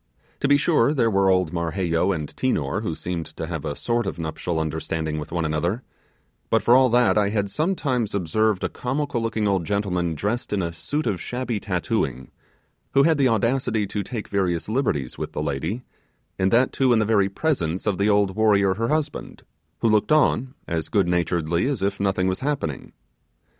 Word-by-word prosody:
To 140 - +1
be 145 0 +5
sure, 145 -2 +2
there 115 -4 +2
were 95 -1 +3
old 90 -3 +2
Marheyo 85 +1 0
and 80 -5 -2
Tinor, 100 - 0
who 85 -8 -3
seemed 85 -2 -4
to 80 - -3
have 80 -3 -5
a 70 - -3
sort 120 +6 -1
of - - -4
nuptial 80 +1 -3
understanding 80 0 -2
with 75 +1 -7
one 85 -1 -1
another; 85 +10 -1 0.7
but - - +2
for 120 - +5
all 130 0 +5
that, 120 -2 +4
I 100 -1 +2
had 100 -2 -1
sometimes 140 - -1
observed 100 +3 +1
a - - 0
comical 135 0 -2
looking 110 -2 -1
old 95 -3 +1
gentleman 90 -3 -1
dressed 105 +10 -2
in 100 -3 0
a 85 0 -3
suit 145 - -3
of 90 -4 -1
shabby 125 -3 -3
tattooing, 90 -8 -2 0.6
who 140 - +6
had 160 -1 +3
the 135 - +4
audacity 115 -1 +1
to 100 +1 -3
take 110 +2 -5
various 90 -5 -1
liberties 105 - -1
with - - -5
the - - -2
lady, 80 - -3 0.6
and 95 0 +3
that 125 +5 +3
too 130 -2 +3
in - - +4
the 110 - +2
very 100 -3 +3
presence 95 - -1
of 100 -3 0
the 100 +2 +3
old 100 -2 +2
warrior 100 -3 +3
her 115 +4 -2
husband, 155 +1 -3 0.4
who - - +3
looked 110 +5 +2
on 135 -3 +2
as 80 -2 -2
good 100 -5 +2
naturedly 85 +1 0
as 135 -9 -1
if 100 0 -1
nothing 95 -2 +1
was 95 0 0
happening. 135 - -3
100 Hz, 195 wpm, -23 LUFS, 85-120 Hz, 0.7 s, who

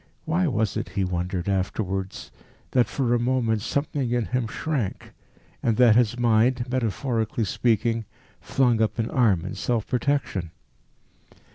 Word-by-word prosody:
Why 175 +3 +1
was 110 - 0
it, - - -3
he 100 - -1
wondered 90 0 -2
afterwards, 95 0 -2 0.4
that 125 -2 +3
for 125 -4 0
a 120 - +3
moment 120 -3 +1
something 140 +1 -1
in 120 -1 0
him 125 0 -1
shrank, 130 -3 -3 0.5
and 115 -2 +1
that 120 -4 +6
his 120 0 +3
mind, 120 +1 +3
metaphorically 115 -2 -1
speaking, 115 +1 +1 0.4
flung 125 -5 +2
up 110 - 0
an 115 -1 -1
arm 105 -9 +2
in 95 - -4
self 115 -3 -1
protection? 125 - -1
115 Hz, 140 wpm, -25 LUFS, 105-125 Hz, 0.5 s, that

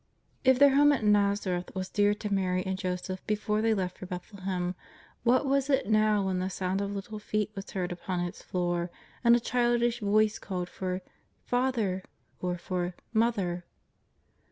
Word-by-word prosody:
If 260 -1 +5
their 280 0 +7
home 290 +1 +7
at 260 - -1
l^azareth 200 -4 +1
was 185 0 -2
dear 205 +1 +2
to 210 -1 -3
Mary 185 -2 +1
and 190 0 -1
Jo 185 -1 -1
seph 185 +1 -6
before 210 0 0
they 225 0 +3
left 180 -2 -3
for 185 - -7
Bethlehem, 185 -1 -3 0.5
what 250 +4 +3
was 275 0 +1
it 270 -4 +2
now 215 -2 +3
when 185 -1 0
the 185 +1 -1
sound 190 +1 -1
of 200 - -2
little 205 +2 -5
feet 210 0 -1
was 195 -1 -7
heard 180 -2 -2
upon 180 +1 -3
its 175 0 -4
floor, 175 -1 -1 0.3
and 235 0 +7
a - - +3
childish 240 0 +1
voice 215 0 +2
called 180 -2 -4
for 185 0 -3 0.2
" - - -42
Father 240 -7 +1 0.2
" - - -40
or 180 -1 -1
for 175 0 -2
'^ 180 - -7 0.2
Mo 230 +1 +4
ther!'' 180 -6 -3
200 Hz, 190 wpm, -29 LUFS, 185-225 Hz, 0.5 s, their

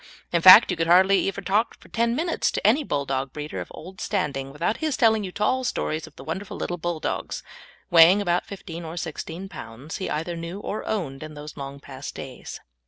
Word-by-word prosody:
In 170 - +3
fact, 185 +4 +10
you 180 - -2
can 165 0 0
hardly 190 +3 +5
ever 195 0 -3
talk 200 +5 0
for - - -17
ten 235 +1 +1
minutes 330 +4 0
to - - -4
any 265 +8 +4
Bulldog 135 - -2
breeder 150 0 -5
of - - -7
old 185 +3 -10
standing 140 -9 -2
without 170 +10 -1
his 310 -4 -1
telling 220 -2 +4
you 185 - -5
tall 235 +7 0
stories 160 -9 -2
of 155 - -17
the - - -11
wonderful 190 +5 -5
little 175 - -3
Bulldogs, 170 -1 -3 0.5
weighing 175 +3 +8
about 175 -3 0
fifteen 175 -4 -8
or 165 +1 -7
sixteen 165 +2 -5
pounds, 140 -4 -8
he 190 - -4
either 165 +3 -2
knew 170 +3 -6
or 210 +1 -4
owned 155 -11 -3
in 155 0 -8
those 150 0 -9
long 140 0 -7
past 135 0 -8
days! 130 -2 -8
175 Hz, 205 wpm, -25 LUFS, 150-200 Hz, 0.5 s, fact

